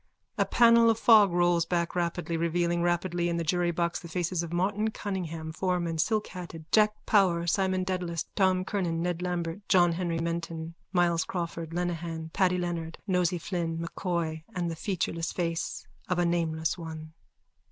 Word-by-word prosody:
_(A -, -, +2 dB
panel 230 Hz, -1 st, +6 dB
of 225 Hz, -, +3 dB
fog 220 Hz, -4 st, +6 dB
rolls 175 Hz, -1 st, +3 dB
back 170 Hz, -1 st, 0 dB
rapidly, 170 Hz, -1 st, -1 dB
revealing 170 Hz, +1 st, 0 dB
rapidly 175 Hz, 0 st, 0 dB
in 170 Hz, -, -1 dB
the 170 Hz, -, -1 dB
jurybox 175 Hz, 0 st, 0 dB
the 170 Hz, -, -10 dB
faces 175 Hz, +1 st, -1 dB
of 170 Hz, -1 st, -5 dB
Martin 200 Hz, +5 st, 0 dB
Cunningham, 170 Hz, -7 st, -4 dB
foreman, 170 Hz, -1 st, -1 dB
silkhatted, 180 Hz, -5 st, -2 dB
Jack 215 Hz, -1 st, +4 dB
Power, 180 Hz, -5 st, +3 dB
Simon 185 Hz, +1 st, +1 dB
Dedalus, 180 Hz, -3 st, -2 dB
Tom 185 Hz, -2 st, +2 dB
Kernan, 175 Hz, -5 st, -1 dB
Ned 175 Hz, -1 st, -2 dB
Lambert, 175 Hz, 0 st, -2 dB
John 175 Hz, -2 st, +5 dB
Henry 170 Hz, -1 st, -1 dB
Menton, 165 Hz, 0 st, -3 dB, 0.2 s
Myles 175 Hz, -3 st, +2 dB
Crawford, 170 Hz, -2 st, -4 dB
Lenehan, 165 Hz, -2 st, -3 dB
Paddy 180 Hz, -1 st, +2 dB
Leonard, 170 Hz, -2 st, -3 dB
Nosey 180 Hz, -2 st, +1 dB
Flynn, 165 Hz, -1 st, -3 dB
M'Coy 170 Hz, -2 st, -3 dB
and 175 Hz, -2 st, -1 dB
the -, -, -4 dB
featureless 165 Hz, -2 st, -2 dB
face 170 Hz, -2 st, -3 dB, 0.2 s
of 180 Hz, -, +1 dB
a 175 Hz, -, +2 dB
Nameless 165 Hz, 0 st, 0 dB
One.) 160 Hz, -1 st, -8 dB
175 Hz, 155 wpm, -28 LUFS, 165-185 Hz, 0.2 s, panel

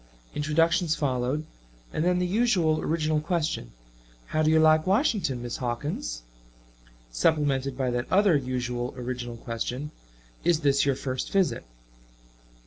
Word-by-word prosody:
Introductions 165 Hz, +2 st, +2 dB
followed, 135 Hz, +1 st, -1 dB, 0.5 s
and 155 Hz, -, 0 dB
then 180 Hz, +1 st, +2 dB
the 180 Hz, -, +1 dB
usual 180 Hz, -6 st, +2 dB
original 155 Hz, -1 st, 0 dB
question, 160 Hz, -, -2 dB, 0.5 s
"How 155 Hz, -, -1 dB
do 155 Hz, -, +3 dB
you 160 Hz, 0 st, +5 dB
like 155 Hz, +1 st, +4 dB
Washington, 190 Hz, -, +1 dB
Miss 120 Hz, -, -4 dB
Hawkins?" 120 Hz, -, -3 dB, 0.9 s
supplemented 135 Hz, -, +1 dB
by 130 Hz, -2 st, 0 dB
that 120 Hz, 0 st, -3 dB
other 195 Hz, -2 st, +5 dB
usual 125 Hz, -2 st, -2 dB
original 120 Hz, -1 st, -5 dB
question, 120 Hz, +6 st, -4 dB, 0.5 s
"Is 170 Hz, -2 st, +2 dB
this 140 Hz, -1 st, +3 dB
your 140 Hz, -, +3 dB
first 130 Hz, -1 st, -4 dB
visit?" 180 Hz, -12 st, +1 dB
150 Hz, 130 wpm, -27 LUFS, 125-165 Hz, 0.9 s, you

